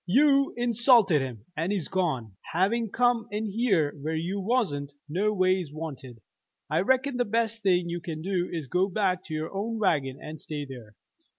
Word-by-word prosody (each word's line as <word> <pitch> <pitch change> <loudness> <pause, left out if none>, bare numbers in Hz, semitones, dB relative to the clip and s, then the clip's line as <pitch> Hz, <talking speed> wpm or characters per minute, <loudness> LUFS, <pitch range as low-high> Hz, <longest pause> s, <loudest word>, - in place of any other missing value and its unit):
You 275 +6 +4
insulted 235 - +4
him, 120 -5 -6
and 165 +5 -1
he's 195 -7 -1
gone. 135 - -1 0.2
Having 210 +6 +1
come 240 0 +2
in 215 +1 -2
here 195 -10 +2
where 160 +2 -2
you 175 +5 -2
wasn't 185 - 0
no 190 +8 +1
ways 185 -5 +1
wanted, 135 -7 -7 0.5
I - - +3
reckon 260 +5 +2
the 245 - +3
best 230 0 -1
thing 180 -3 +2
you 170 0 -3
can 160 -3 -6
do 180 -1 -1
is 165 -4 -3
to - - -18
go 185 +2 +2
back 185 -2 0
to 155 - -5
your 155 +3 -4
own 220 +4 -2
wagon 140 -10 +1
and 155 0 -8
stay 150 -2 -5
there. 120 -6 -11
185 Hz, 185 wpm, -27 LUFS, 155-225 Hz, 0.5 s, You